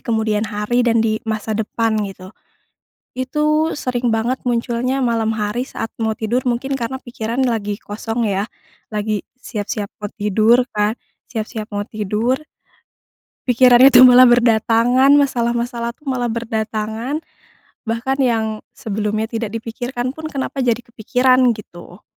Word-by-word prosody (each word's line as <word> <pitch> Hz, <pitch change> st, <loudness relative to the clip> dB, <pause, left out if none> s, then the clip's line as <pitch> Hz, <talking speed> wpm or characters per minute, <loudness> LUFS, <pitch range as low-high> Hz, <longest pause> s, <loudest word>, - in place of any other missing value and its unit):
kemudian 220 Hz, -1 st, 0 dB
hari 210 Hz, +3 st, -1 dB
dan 230 Hz, -1 st, +3 dB
di 220 Hz, -1 st, +1 dB
masa 220 Hz, 0 st, -2 dB
depan 220 Hz, +1 st, -1 dB
gitu. 185 Hz, -1 st, -10 dB, 0.8 s
Itu 300 Hz, +4 st, 0 dB
sering 245 Hz, -1 st, -1 dB
banget 225 Hz, +4 st, -1 dB
munculnya 245 Hz, +2 st, -1 dB
malam 230 Hz, -3 st, +1 dB
hari 210 Hz, +4 st, -1 dB
saat 225 Hz, -, -5 dB, 0.2 s
mau 220 Hz, 0 st, +1 dB
tidur 235 Hz, +3 st, 0 dB
mungkin 265 Hz, +3 st, -2 dB
karena 265 Hz, +1 st, -3 dB
pikiran 240 Hz, -1 st, -4 dB
lagi 210 Hz, -3 st, -2 dB
kosong 225 Hz, +2 st, -3 dB
ya, 200 Hz, -1 st, 0 dB, 0.5 s
lagi 210 Hz, -1 st, -2 dB, 0.2 s
siap-siap 210 Hz, -3 st, -4 dB, 0.2 s
mau 205 Hz, -, -4 dB
tidur 220 Hz, +4 st, +2 dB
kan, 210 Hz, +2 st, 0 dB, 0.3 s
siap-siap 220 Hz, -2 st, -5 dB
mau 205 Hz, 0 st, -3 dB
tidur, 220 Hz, +6 st, -1 dB, 1.0 s
pikiran 245 Hz, 0 st, +5 dB
itu 260 Hz, -2 st, +8 dB
malah 255 Hz, 0 st, +9 dB
berdatangan, 240 Hz, +2 st, +4 dB
masalah-masalah 235 Hz, -3 st, +1 dB
tuh 285 Hz, +1 st, -9 dB
malah 250 Hz, -2 st, -1 dB
berdatangan, 225 Hz, +4 st, -3 dB, 0.6 s
bahkan 230 Hz, +4 st, -1 dB
yang 235 Hz, -5 st, +2 dB, 0.3 s
sebelumnya 215 Hz, -3 st, -2 dB
tidak 225 Hz, -2 st, -4 dB
dipikirkan 245 Hz, +2 st, -4 dB
pun 315 Hz, -, -7 dB
kenapa 275 Hz, -3 st, -3 dB
jadi 235 Hz, 0 st, +1 dB
kepikiran 250 Hz, +2 st, +2 dB
gitu. 180 Hz, -3 st, -12 dB
230 Hz, 130 wpm, -19 LUFS, 215-250 Hz, 1.0 s, malah